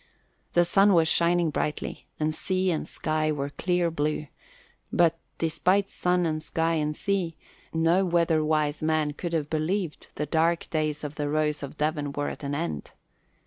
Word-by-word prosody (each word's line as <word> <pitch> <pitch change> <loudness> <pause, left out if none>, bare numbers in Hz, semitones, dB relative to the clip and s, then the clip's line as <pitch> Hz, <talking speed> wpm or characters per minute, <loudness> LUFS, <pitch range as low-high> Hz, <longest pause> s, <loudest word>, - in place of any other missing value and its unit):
The 175 0 +5
sun 195 +2 +5
was 165 -1 +4
shining 170 0 +3
brightly 150 +1 -3
and 155 0 +1
sky 185 +2 0
and 155 - -3
sea 155 0 -1
were 140 -2 -2
a - - -5
clear 175 +3 0
blue; 150 0 -1 0.7
but 165 -1 +3 0.2
despite 180 +5 +1
sun 180 0 +1
and 155 -1 -1
sky 165 +1 0
and 150 -1 0
sea 180 -4 -1 0.3
no 165 +3 +3
weatherwise 155 -4 +1
man 155 -1 +1
could 170 +3 -5
have 155 -3 0
believed 165 +2 -1
the 150 - -2
dark 165 +3 +1
days 155 -2 -1
of 150 0 -6
the 145 -1 -1
Rose 150 0 0
of 140 +1 -7
Devon 150 -2 -1
were 145 0 -1
at - - -8
an 140 0 -2
end. 80 - -3
155 Hz, 170 wpm, -27 LUFS, 150-170 Hz, 0.7 s, The